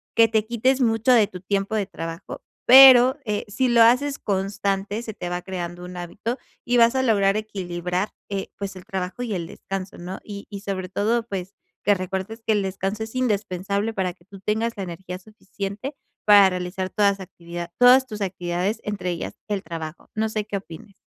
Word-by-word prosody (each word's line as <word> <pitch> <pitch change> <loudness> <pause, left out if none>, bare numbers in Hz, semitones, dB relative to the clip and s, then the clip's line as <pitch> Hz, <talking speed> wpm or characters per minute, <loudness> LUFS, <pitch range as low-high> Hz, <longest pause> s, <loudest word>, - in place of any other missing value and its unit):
que 230 0 +7
te 220 -1 +1
quites 255 +3 +1
mucho 225 +1 +3
de 220 -4 +5
tu 185 -3 -10
tiempo 200 +2 -1
de 205 -2 +1
trabajo, 165 -1 -7 0.2
pero, 260 0 +9
eh, 210 -2 -2
si 255 +5 +1
lo 235 -1 +6
haces 275 +5 +3
constante, 200 +2 -1
se 220 - -6
te 175 -2 -5
va 175 0 -3
creando 175 -1 -5
un 180 0 -9
hábito 215 +8 -4 0.3
y 245 0 +3
vas 235 +2 +5
a 260 - +2
lograr 205 -4 +3
equilibrar, 180 -2 -3 0.2
eh, 195 -1 -3
pues 195 -1 -5
el 180 - -11
trabajo 190 +4 -4
y 225 -4 -3
el 170 -2 -3
descanso, 195 +1 -6
¿no?, 180 +2 -6
y 200 -1 -8
y 200 -1 -7
sobre 190 -2 -4
todo, 225 +5 +1
pues, 190 -2 -5 0.3
que 205 - +5
recuerdes 190 +4 -4
que 220 - +3
el 205 -2 +1
descanso 195 +3 -3
es 220 - -8
indispensable 200 -3 -1
para 190 -4 -1
que 175 - -28
tú 195 0 -13
tengas 220 +4 -1
la 195 - -3
energía 180 +1 -7
suficiente 205 +5 -7 0.3
para 205 -2 +8
realizar 180 +1 -3
toda 200 0 +3
esa 195 -1 -6
actividad 170 -1 -8
todas 255 +1 +7
tus 215 -3 -7
actividades, 180 +2 -2
entre 190 -4 -3
ellas, 170 - -5
el 200 -2 -1
trabajo. 160 0 -7
No 220 0 0
sé 215 -1 -2
qué 205 -2 -3
opines. 190 +2 -11
200 Hz, 195 wpm, -23 LUFS, 185-220 Hz, 0.3 s, pero